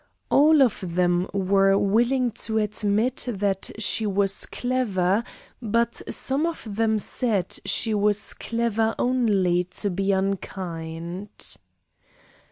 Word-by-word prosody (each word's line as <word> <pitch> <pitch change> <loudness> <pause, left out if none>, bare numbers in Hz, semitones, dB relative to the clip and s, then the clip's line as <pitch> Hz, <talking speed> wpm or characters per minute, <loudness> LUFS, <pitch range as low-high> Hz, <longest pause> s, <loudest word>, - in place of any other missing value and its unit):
All 300 0 +6
of 190 -8 -1
them 175 0 +2
were 195 0 +3
willing 240 +5 +2
to 220 0 -3
admit 215 +3 0
that 200 -3 -1
she 220 0 0
was 195 0 0
clever, 220 -5 0 0.4
but 235 +1 0
some 280 +5 0
of 335 - -5
them 220 +1 +1
said 210 -3 -1
she 225 - 0
was 210 0 +1
clever 225 -1 -1
only 205 -8 +2
to 195 +3 -3
be 195 +2 0
unkind. 180 -2 -4
205 Hz, 110 wpm, -24 LUFS, 190-235 Hz, 0.4 s, All